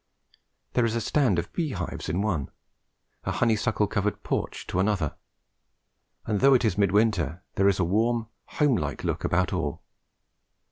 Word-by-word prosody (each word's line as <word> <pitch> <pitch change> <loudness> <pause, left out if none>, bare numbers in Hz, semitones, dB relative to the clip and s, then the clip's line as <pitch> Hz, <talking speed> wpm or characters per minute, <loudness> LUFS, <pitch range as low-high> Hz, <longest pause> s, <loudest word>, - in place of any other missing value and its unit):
There 125 - +3
is 115 -1 +1
a - - +1
stand 120 - +2
of 85 - -3
bee 160 -6 -1
hives 90 -3 -4
in 90 +5 0
one, 85 -11 -1 0.7
a - - -2
honeysuckle 110 -2 +1
covered 105 0 -2
porch - - -3
to 90 - -2
another, 95 -6 0 1.1
and, 105 -2 0
though 135 +3 +6
it 125 - +2
is 105 -5 +2
mid 100 -2 +2
winter, 95 -6 +1
there 100 +1 +4
is 100 - +1
a - - +3
warm 115 +5 +1 0.2
home 145 -6 +2
like 75 -3 -3
look - - -2
about - - +1
all. - - -2
105 Hz, 170 wpm, -26 LUFS, 90-115 Hz, 1.1 s, though